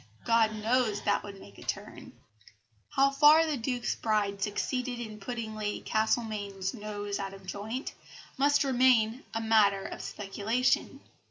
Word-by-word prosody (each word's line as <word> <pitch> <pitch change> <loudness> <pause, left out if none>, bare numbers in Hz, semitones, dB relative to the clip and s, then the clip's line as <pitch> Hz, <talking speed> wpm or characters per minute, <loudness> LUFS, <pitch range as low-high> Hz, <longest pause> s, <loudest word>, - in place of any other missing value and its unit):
God 225 -1 +3
knows 220 -1 +1
that 205 - +2
would 200 -1 -10
make 100 - -14
a - - -12
great - - -13
turn." - - -6 0.8
How 275 +1 +3
far 300 +3 +6
the 310 -2 -1
Duke's 245 0 -2
bride 205 -3 -1
succeeded 245 +4 -2
in 215 -3 -7
putting 230 0 -5
Lady 210 -1 -3
Castlemaine's 210 -4 -1
"nose 205 -2 -5
out 195 0 -5
of 195 -1 -14
joint" 215 +7 -5 0.4
must 285 +2 +3
remain 250 -3 +3
a 225 - 0
matter 210 -3 +3
of - - -6
speculation. 210 +5 -1
220 Hz, 150 wpm, -29 LUFS, 205-250 Hz, 0.8 s, far